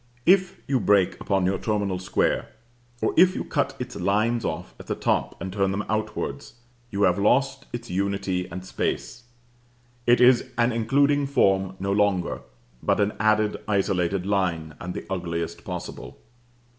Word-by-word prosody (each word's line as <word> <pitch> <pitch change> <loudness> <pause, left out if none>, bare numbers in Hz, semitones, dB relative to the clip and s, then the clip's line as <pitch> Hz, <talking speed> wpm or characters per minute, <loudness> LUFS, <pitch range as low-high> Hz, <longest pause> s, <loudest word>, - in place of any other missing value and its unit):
But - - +7
if 185 -1 -1
you 135 -2 +2
break 100 -3 +2
upon 95 -2 +1
your 95 +1 0
terminal 100 -4 -1
square, 90 - 0 0.5
or - - +1
if 185 +2 +6
you - - -2
cut 140 -2 -1
its 125 0 -6
lines 110 +6 +1
off - - -4
at - - -11
the - - -1
top - - -1
and 95 -1 -5
turn 95 -1 +1
them 100 +2 -2
outwards, 110 -10 -3 0.4
you 100 -2 -1
have 90 0 +3
lost 135 +6 +2
its 120 0 -6
unity 95 -1 -1
and 90 +2 -7
space. 115 +4 -3 0.8
It 120 0 +5
is 125 -1 +6
an 120 +1 +3
including 140 +5 +2
form 95 -7 +2
no 100 +1 -1
longer, 100 -3 +1 0.4
but - - +1
an 105 0 +2
added, 110 0 +2
isolated 95 -2 0
line, 90 -6 -1
and 90 +1 -6
the - - -5
ugliest 85 -3 -4
possible. - - -7
100 Hz, 160 wpm, -25 LUFS, 95-120 Hz, 0.8 s, But